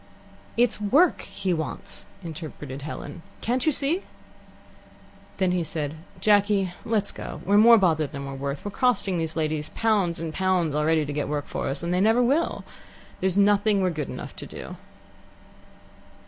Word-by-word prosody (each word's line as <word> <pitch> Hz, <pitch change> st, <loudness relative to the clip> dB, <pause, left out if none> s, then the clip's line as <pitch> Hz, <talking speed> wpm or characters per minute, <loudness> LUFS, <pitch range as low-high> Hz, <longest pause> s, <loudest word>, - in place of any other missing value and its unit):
"It's 235 Hz, -3 st, +2 dB
work 290 Hz, -, +4 dB
he 195 Hz, -2 st, -2 dB
wants," 160 Hz, -2 st, -4 dB, 0.2 s
interpreted 150 Hz, -4 st, -7 dB
Helen. 155 Hz, +3 st, -7 dB, 0.2 s
"Can't 245 Hz, +5 st, 0 dB
you -, -, +6 dB
see?" 295 Hz, +6 st, +1 dB, 1.4 s
Then 185 Hz, -2 st, +2 dB
he 180 Hz, -1 st, +1 dB
said: 155 Hz, -2 st, -3 dB, 0.3 s
"Jacky, 205 Hz, -2 st, +3 dB
let's 215 Hz, -3 st, 0 dB
go. -, -, -7 dB
We're 205 Hz, +2 st, +5 dB
more 230 Hz, +2 st, +8 dB
bother 160 Hz, -6 st, +2 dB
than 140 Hz, -1 st, -7 dB
we're 135 Hz, -, -6 dB
worth. 140 Hz, +3 st, -4 dB
We're 205 Hz, -, -3 dB
costing 200 Hz, -7 st, +1 dB
these 160 Hz, -1 st, -2 dB
ladies 155 Hz, -1 st, -1 dB
pounds 205 Hz, -7 st, +1 dB
and 160 Hz, -1 st, -4 dB
pounds 185 Hz, -4 st, +1 dB
already 155 Hz, +1 st, +2 dB
to 145 Hz, -, -4 dB
get 145 Hz, 0 st, -2 dB
work 145 Hz, -1 st, -2 dB
for -, -, -4 dB
us, 135 Hz, -, -2 dB
and 170 Hz, +1 st, -1 dB
they 180 Hz, -, +2 dB
never 225 Hz, +4 st, +4 dB
will. 285 Hz, +7 st, +1 dB, 0.6 s
There's 190 Hz, 0 st, 0 dB
nothing 205 Hz, 0 st, +4 dB
we're 185 Hz, -, +2 dB
good 150 Hz, -4 st, -4 dB
enough -, -, -7 dB
to -, -, -7 dB
do." -, -, -8 dB
180 Hz, 165 wpm, -25 LUFS, 155-210 Hz, 1.4 s, more